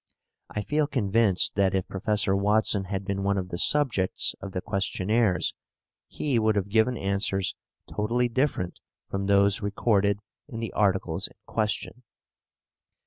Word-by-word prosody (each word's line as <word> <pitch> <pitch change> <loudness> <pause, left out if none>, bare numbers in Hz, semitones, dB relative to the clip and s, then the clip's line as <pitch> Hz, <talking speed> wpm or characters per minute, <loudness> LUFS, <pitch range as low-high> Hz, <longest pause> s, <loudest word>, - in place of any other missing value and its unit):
I 105 - -4
feel 150 +3 +1
convinced 110 -6 +2
that 95 -1 +2
if 95 - -1
Professor 100 0 +1
Watson 105 0 +2
had 95 0 -4
been 100 -1 -2
one 100 0 +1
of 90 -1 -3
the 85 - -5
subjects 125 -11 +1
of 100 - -6
the 95 - -3
questionnaires, 100 0 0 0.5
he 135 -6 -1
would 110 -1 +2
have 100 -1 -1
given 115 +3 +2
answers 95 -1 0 0.3
totally 120 +4 0
different 120 -8 -1 0.3
from 100 0 -2
those 100 +1 +3
recorded 100 -1 +1 0.3
in 115 -6 -7
the 115 - -5
articles 95 -3 +1
in - - -20
question. 110 +2 -2
100 Hz, 140 wpm, -26 LUFS, 95-110 Hz, 0.5 s, those